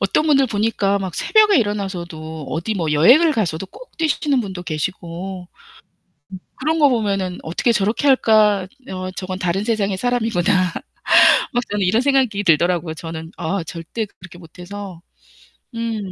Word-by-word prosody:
어떤 195 Hz, +10 st, +1 dB
분들 275 Hz, -3 st, +4 dB
보니까 205 Hz, -2 st, 0 dB
막 190 Hz, -3 st, -5 dB
새벽에 430 Hz, -2 st, +4 dB
일어나서도 175 Hz, -, -4 dB
어디 170 Hz, +8 st, -2 dB
뭐 165 Hz, -6 st, -1 dB
여행을 255 Hz, -, +5 dB
가서도 195 Hz, -, -2 dB
꼭 -, -, -15 dB
뛰시는 300 Hz, -4 st, +1 dB
분도 190 Hz, -5 st, -6 dB
계시고. 175 Hz, +3 st, -5 dB
음. -, -, -25 dB, 0.9 s
그런 315 Hz, +4 st, 0 dB
거 290 Hz, -, +6 dB
보면은 200 Hz, -7 st, -1 dB
'어떻게 170 Hz, +9 st, -1 dB
저렇게 215 Hz, +6 st, 0 dB
할까? 215 Hz, -7 st, +4 dB, 0.2 s
어 185 Hz, 0 st, -5 dB
저건 185 Hz, 0 st, -6 dB
다른 180 Hz, +1 st, -1 dB
세상의 205 Hz, -4 st, -1 dB
사람이구나.' 205 Hz, -6 st, +1 dB, 0.8 s
막 245 Hz, -, 0 dB
저는 205 Hz, -2 st, 0 dB
이런 220 Hz, +7 st, +2 dB
생각이 255 Hz, -7 st, +1 dB
들더라고요. 170 Hz, 0 st, +2 dB
저는 160 Hz, 0 st, -7 dB
아 190 Hz, +3 st, -2 dB
절대 165 Hz, +7 st, -5 dB
그렇게 175 Hz, 0 st, -13 dB
못 165 Hz, 0 st, -16 dB
해서. 190 Hz, -1 st, -8 dB, 0.7 s
음. 230 Hz, -1 st, -3 dB
195 Hz, 325 characters per minute, -20 LUFS, 175-230 Hz, 0.9 s, 거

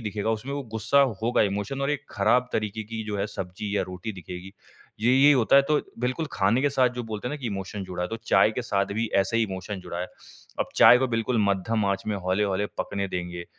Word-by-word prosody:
दिखेगा 105 Hz, -1 st, -2 dB
उसमें 110 Hz, +5 st, -3 dB
वो 140 Hz, -, -3 dB
गुस्सा 110 Hz, +5 st, +3 dB, 0.2 s
होगा 120 Hz, +2 st, +3 dB
इमोशन 105 Hz, +6 st, -2 dB
और 140 Hz, -, +1 dB
एक 150 Hz, -, -2 dB
ख़राब 120 Hz, +5 st, +2 dB
तरीक़े 110 Hz, 0 st, -2 dB
की 110 Hz, +1 st, -6 dB
जो 105 Hz, -1 st, -3 dB
है 100 Hz, -, 0 dB
सब्ज़ी 100 Hz, +1 st, -5 dB
या -, -, +2 dB
रोटी 95 Hz, +4 st, -6 dB
दिखेगी। 90 Hz, +1 st, -9 dB, 0.5 s
ये 120 Hz, +3 st, +3 dB
यही 140 Hz, +3 st, +7 dB
होता 130 Hz, -1 st, +4 dB
है 140 Hz, -, +7 dB
तो 150 Hz, -1 st, +3 dB, 0.2 s
बिल्कुल 130 Hz, +6 st, -1 dB
ख़ाने 105 Hz, +7 st, +2 dB
के 145 Hz, -, +2 dB
साथ 130 Hz, -2 st, +3 dB
जो 125 Hz, -, -2 dB
बोलते 110 Hz, +3 st, -3 dB
हैं 150 Hz, -, -4 dB
कि 130 Hz, -, -5 dB
इमोशन 100 Hz, -1 st, -4 dB
जुड़ा। 90 Hz, -1 st, -3 dB
तो 115 Hz, -, -5 dB
चाय 95 Hz, +2 st, +5 dB
के 125 Hz, -, -3 dB
साथ 100 Hz, -3 st, 0 dB
भी 115 Hz, +1 st, 0 dB
ऐसे 105 Hz, +4 st, -1 dB
ही 115 Hz, -, +3 dB
इमोशन 95 Hz, 0 st, -5 dB
जुड़ा 85 Hz, -1 st, -6 dB
है। 90 Hz, -, -2 dB, 0.5 s
अब -, -, +1 dB
चाय 125 Hz, -, +8 dB
को 130 Hz, -, +1 dB
बिल्कुल 115 Hz, +1 st, 0 dB
मध्यम 105 Hz, +3 st, 0 dB
आँच 100 Hz, 0 st, 0 dB
में 105 Hz, -1 st, -1 dB
हौले-हौले 95 Hz, +1 st, 0 dB
पकने 100 Hz, -1 st, -2 dB
देंगे 90 Hz, -1 st, -5 dB
105 Hz, 230 wpm, -26 LUFS, 95-125 Hz, 0.5 s, चाय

